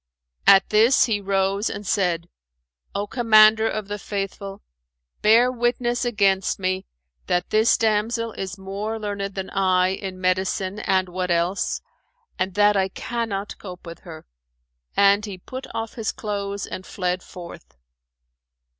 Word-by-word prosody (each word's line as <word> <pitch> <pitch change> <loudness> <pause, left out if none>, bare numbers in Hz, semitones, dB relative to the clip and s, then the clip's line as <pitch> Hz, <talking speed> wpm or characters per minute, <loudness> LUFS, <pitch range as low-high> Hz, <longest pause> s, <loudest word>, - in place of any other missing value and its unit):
At 195 -1 +7
this, 225 +5 +5
he 215 -4 -1
rose 195 +1 0
and 205 - -6
said, 175 -4 0 0.7
"O 200 - -1
Commander 220 -1 +5
of 215 -2 -4
the 205 0 -5
Faithful, 195 0 -5 0.6
bear 230 +4 +5
witness 240 0 0
against 200 -5 +2
me 185 0 -2 0.4
that 175 0 0
this 220 +2 +4
damsel 225 +1 0
is 195 -1 -6
more 200 +3 -4
learned 200 -2 -4
than 190 -1 -5
I 185 -1 +2
in 190 -1 -5
medicine 185 +2 0
and 190 -2 +1
what 180 0 -3
else, 175 +3 0 0.6
and 185 0 -1
that 205 0 +4
I 190 -1 +2
cannot 210 -1 -4
cope 180 -3 -10
with 170 0 -9
her." 160 -3 -11 0.7
And 200 +1 +5
he 200 -3 -6
put 260 +8 -8
off 225 -1 -4
his 225 -4 -2
clothes 200 -2 -4
and 185 - -7
fled 180 -1 -2
forth. 175 - -11
200 Hz, 140 wpm, -23 LUFS, 185-215 Hz, 0.7 s, At